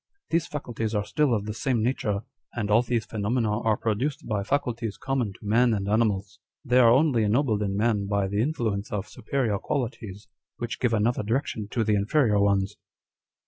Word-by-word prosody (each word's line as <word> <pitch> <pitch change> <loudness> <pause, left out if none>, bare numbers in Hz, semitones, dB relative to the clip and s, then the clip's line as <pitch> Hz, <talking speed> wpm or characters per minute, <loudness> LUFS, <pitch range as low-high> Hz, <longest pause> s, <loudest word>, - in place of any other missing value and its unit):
these 165 0 +1
faculties 115 -6 -4
are 105 0 0
still 150 +2 +1
of 105 -3 0
the 105 - -4
same 120 0 0
nature, 105 -5 0 0.3
and 105 -3 -2
all 110 +3 +6
these 120 -2 -1
phenomena 110 +1 -1
are 110 -2 +2
produced 135 +8 -2
by 105 -3 0
faculties 115 -4 -2
common 130 -6 -1
to 95 - -14
man 115 +2 +3
and 100 -1 -3
animals. 105 -2 0 0.3
They 125 0 +4
are 120 -2 +7
only 130 -2 +4
ennobled 110 0 +1
in 100 -1 -1
man 105 -2 +1
by 100 -1 0
the 100 +2 0
influence 110 -7 -1
of 105 -1 -3
superior 115 -4 -2
qualities, 110 -7 -4 0.3
which 120 0 -4
give 120 -2 +2
another 115 +3 +1
direction 110 -1 -2
to 115 +2 -1
the 110 -1 +1
inferior 105 +2 +2
ones." 100 0 +1
110 Hz, 185 wpm, -26 LUFS, 105-125 Hz, 0.3 s, are